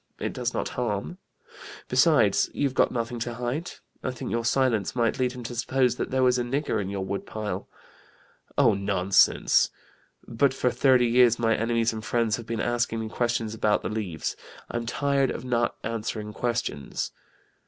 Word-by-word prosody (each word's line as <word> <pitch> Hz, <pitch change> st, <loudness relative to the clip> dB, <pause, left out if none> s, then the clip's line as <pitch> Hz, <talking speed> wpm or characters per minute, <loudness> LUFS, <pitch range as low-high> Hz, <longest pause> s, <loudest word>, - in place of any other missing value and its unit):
It -, -, -3 dB
does -, -, -2 dB
not -, -, -2 dB
harm. 120 Hz, -, -3 dB, 0.7 s
Besides, 395 Hz, -3 st, +4 dB
you've 140 Hz, -2 st, 0 dB
got -, -, +3 dB
nothing 120 Hz, 0 st, -3 dB
to 120 Hz, +1 st, -3 dB
hide. 125 Hz, +8 st, -3 dB, 0.3 s
I -, -, -1 dB
think 125 Hz, -2 st, -5 dB
your 115 Hz, 0 st, 0 dB
silence 120 Hz, -5 st, +1 dB
might 120 Hz, -1 st, +1 dB
lead 125 Hz, -1 st, +1 dB
him 125 Hz, -1 st, -8 dB
to 115 Hz, -, -6 dB
suppose 125 Hz, +1 st, +1 dB
there 130 Hz, 0 st, 0 dB
was 125 Hz, 0 st, +4 dB
a -, -, 0 dB
nigger 125 Hz, -3 st, -1 dB
in 95 Hz, -, -4 dB
your 100 Hz, -1 st, -3 dB
wood 100 Hz, +1 st, -4 dB
pile.' 105 Hz, -1 st, -4 dB, 0.9 s
'Oh, 125 Hz, -6 st, +5 dB
nonsense! 100 Hz, -1 st, +3 dB, 0.6 s
But 130 Hz, +3 st, +1 dB
for 125 Hz, -2 st, +1 dB
thirty 130 Hz, -2 st, +4 dB
years 120 Hz, 0 st, +5 dB
my 115 Hz, -1 st, +2 dB
enemies 115 Hz, 0 st, +1 dB
and 110 Hz, -1 st, -6 dB
friends 115 Hz, -3 st, +1 dB
have 115 Hz, -, -9 dB
been 115 Hz, -1 st, -3 dB
asking 120 Hz, -1 st, 0 dB
me 110 Hz, -1 st, -4 dB
questions 115 Hz, -2 st, -1 dB
about 105 Hz, -1 st, +1 dB
the 90 Hz, -, -2 dB
Leaves: 100 Hz, -7 st, -3 dB, 0.4 s
I'm 120 Hz, 0 st, -3 dB
tired 140 Hz, +1 st, +1 dB
of 125 Hz, -, -5 dB
not 120 Hz, -2 st, 0 dB
answering 110 Hz, -1 st, -4 dB
questions.' 115 Hz, -, -2 dB
120 Hz, 175 wpm, -26 LUFS, 110-125 Hz, 0.9 s, Oh